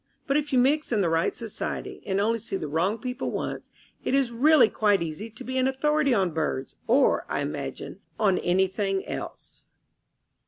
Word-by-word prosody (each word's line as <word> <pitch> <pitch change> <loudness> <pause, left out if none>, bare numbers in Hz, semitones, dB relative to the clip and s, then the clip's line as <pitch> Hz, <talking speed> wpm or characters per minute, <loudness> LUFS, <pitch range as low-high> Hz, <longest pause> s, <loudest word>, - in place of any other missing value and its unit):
But 275 - 0
if 300 0 0
you 260 - +3
mix 280 +4 +2
in 215 -3 +2
the 175 - +2
right 165 0 +1
society, 225 -3 -5
and 195 0 +1
only 225 +3 +1
see 220 - -5
the 155 - -4
wrong 170 +9 0
people 250 +1 -4
once, - - -4 0.3
it 265 - +1
is 270 -3 +2
really 260 +1 +5
quite 205 -5 +2
easy 165 +7 -5
to 225 +4 -10
be 260 +1 -2
an 255 - +3
authority 290 +2 +1
on 195 -7 +2
birds 150 -4 -2
or, 255 +5 +4
I - - -1
imagine, - - -5 0.2
on 195 -3 +3
anything 190 +2 0
else. - - -7
225 Hz, 185 wpm, -26 LUFS, 190-260 Hz, 0.3 s, really